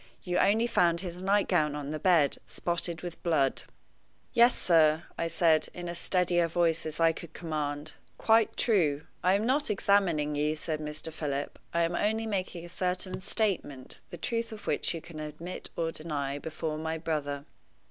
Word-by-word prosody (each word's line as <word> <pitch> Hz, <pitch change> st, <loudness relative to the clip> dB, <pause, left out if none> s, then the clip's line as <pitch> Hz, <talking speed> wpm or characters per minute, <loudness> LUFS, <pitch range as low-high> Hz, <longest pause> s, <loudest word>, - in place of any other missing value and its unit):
You 180 Hz, -1 st, 0 dB
only 220 Hz, +4 st, +4 dB
found 175 Hz, -7 st, +2 dB
his 180 Hz, -1 st, -6 dB
nightgown 185 Hz, -6 st, +2 dB
on 145 Hz, -1 st, -4 dB
the 155 Hz, -, -3 dB
bed, 160 Hz, -5 st, +3 dB
spotted 170 Hz, -1 st, -3 dB
with 175 Hz, -2 st, -7 dB
blood." 150 Hz, -6 st, +1 dB, 0.7 s
"Yes, 240 Hz, +1 st, +5 dB
sir," 160 Hz, -2 st, +4 dB
I 165 Hz, -, -1 dB
said, 165 Hz, -1 st, +3 dB
in 175 Hz, 0 st, -5 dB
as 170 Hz, 0 st, -2 dB
steady 180 Hz, -2 st, +2 dB
a 170 Hz, -, +3 dB
voice 165 Hz, -1 st, +1 dB
as 155 Hz, 0 st, -3 dB
I 165 Hz, 0 st, +5 dB
could 165 Hz, 0 st, -10 dB
command. 150 Hz, -2 st, -3 dB, 0.2 s
"Quite 225 Hz, -1 st, +3 dB
true." 160 Hz, -10 st, +2 dB, 0.2 s
"I 185 Hz, +1 st, +4 dB
am 205 Hz, +2 st, 0 dB
not 275 Hz, +4 st, +2 dB
examining 185 Hz, -7 st, +2 dB
you," 150 Hz, +1 st, 0 dB
said 155 Hz, 0 st, -3 dB
Mr. 155 Hz, +1 st, -5 dB
Philip. 145 Hz, -3 st, -3 dB
"I 170 Hz, 0 st, +2 dB
am 165 Hz, +1 st, 0 dB
only 220 Hz, +5 st, 0 dB
making 185 Hz, -5 st, -3 dB
a -, -, -10 dB
certain 185 Hz, +1 st, -2 dB
statement, 185 Hz, -, -2 dB
the 175 Hz, -, -8 dB
truth 230 Hz, +7 st, -2 dB
of 215 Hz, -1 st, -9 dB
which -, -, 0 dB
you 165 Hz, -, -5 dB
can 160 Hz, -2 st, -10 dB
admit 155 Hz, +4 st, -7 dB
or 165 Hz, -1 st, -1 dB
deny 145 Hz, -3 st, -3 dB
before 155 Hz, 0 st, -4 dB
my 160 Hz, +1 st, -2 dB
brother." 145 Hz, -3 st, -3 dB
165 Hz, 180 wpm, -29 LUFS, 155-185 Hz, 0.7 s, Yes